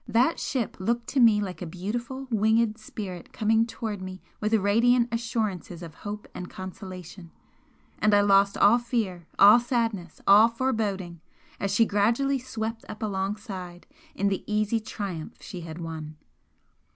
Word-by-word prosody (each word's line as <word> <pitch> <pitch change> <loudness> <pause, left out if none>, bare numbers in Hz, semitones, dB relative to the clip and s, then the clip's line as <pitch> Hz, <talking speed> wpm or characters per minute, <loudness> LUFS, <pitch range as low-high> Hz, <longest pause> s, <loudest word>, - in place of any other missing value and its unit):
That 250 +8 +2
ship 250 -5 -2
looked 235 +5 -1
to 275 - 0
me 225 -4 +6
like 185 -5 -5
a 180 - -4
beautiful 235 +10 -4
winged 220 +1 +2
spirit 195 -5 -7
coming 225 0 +2
towards 215 -4 -5
me 185 0 -7 0.2
with 210 0 -1
radiant 235 +4 +3
assurances 220 -7 -3
of 165 -2 -9
hope 210 0 -6
and 180 - -7
consolation, 185 -2 -9 0.7
and 215 - +3
I 205 - +6
lost 200 0 +4
all 220 +4 +6
fear, 210 -8 -2
all 205 +4 +9
sadness, 230 -8 -2
all 210 +3 +8
foreboding, 210 -8 -2 0.4
as 200 - -1
she 225 +3 +4
gradually 235 +7 +2
swept 225 -2 -5
up 215 +1 -7
alongside 190 -3 -4 0.3
in 200 +1 +1
the 195 - -2
easy 215 +2 +1
triumph 195 -7 -6
she 180 - -8
had 165 -1 -8
won. 160 -2 -6
210 Hz, 150 wpm, -26 LUFS, 185-230 Hz, 0.7 s, all